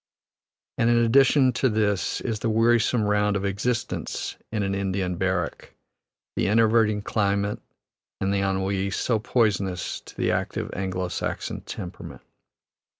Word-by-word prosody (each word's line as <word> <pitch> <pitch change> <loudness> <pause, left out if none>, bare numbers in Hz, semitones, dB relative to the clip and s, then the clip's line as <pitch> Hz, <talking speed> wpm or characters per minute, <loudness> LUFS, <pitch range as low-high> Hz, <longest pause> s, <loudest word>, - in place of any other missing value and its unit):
And 115 - +3
in 120 - +4
addition 130 +3 +5
to 130 - +2
this 105 -3 0
is 110 -4 -2
the 115 - -1
wearisome 115 +1 +3
round 105 0 +2
of 100 0 -1
existence 110 +5 -2 0.2
in 105 -2 -1
an 95 0 -1
Indian 95 -2 -1
barrack, 90 -2 -2 0.6
the - - +1
enervating 110 -1 +3
climate 100 -1 0 0.6
and 95 0 0
the 100 - +1
ennui, 95 0 0
so 110 +4 0
poisonous 100 -6 0
to - - -15
the - - +1
active - - -2
Anglo 95 -1 -2
Saxon - - -4
temperament. 90 - -8
105 Hz, 135 wpm, -25 LUFS, 95-115 Hz, 0.6 s, addition